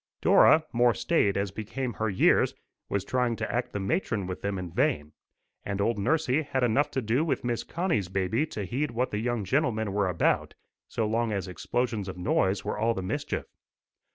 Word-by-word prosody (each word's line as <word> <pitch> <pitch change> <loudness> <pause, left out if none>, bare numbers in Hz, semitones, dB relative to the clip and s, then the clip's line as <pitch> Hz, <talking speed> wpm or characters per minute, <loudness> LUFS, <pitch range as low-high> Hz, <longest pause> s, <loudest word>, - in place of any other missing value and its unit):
Dora, 155 0 +6
more 120 0 +4
staid 105 - +1
as 100 -1 -1
became 120 +5 -4
her 110 0 -1
years, 95 - +3 0.3
was 100 -1 -1
trying 125 -2 0
to - - -3
act 120 +1 -1
the 100 - -3
matron 100 - -1
with 90 0 -5
them 100 -1 -2
in 90 -2 -5
vain, 100 - 0 0.5
and 100 -1 -3
old 105 +1 +1
nursie 155 +5 +1
had 135 -3 -1
enough 125 +5 +2
to 130 - -2
do 120 +7 +1
with 165 - -1
Miss 120 -1 -1
Connie's 165 - -1
baby 95 - 0
to 105 -8 -5
heed 135 +10 -1
what 120 +2 -1
the 105 - -1
young 120 -2 -1
gentlemen 110 -4 0
were 100 -1 +1
about, 90 - +1 0.3
so 110 - -1
long 115 +1 0
as 100 -3 -2
explosions 110 +2 -2
of 95 - -7
noise 95 +2 +1
was - - -2
all 115 +1 +2
the 95 - -3
mischief. 90 - -3
110 Hz, 195 wpm, -28 LUFS, 100-125 Hz, 0.5 s, Dora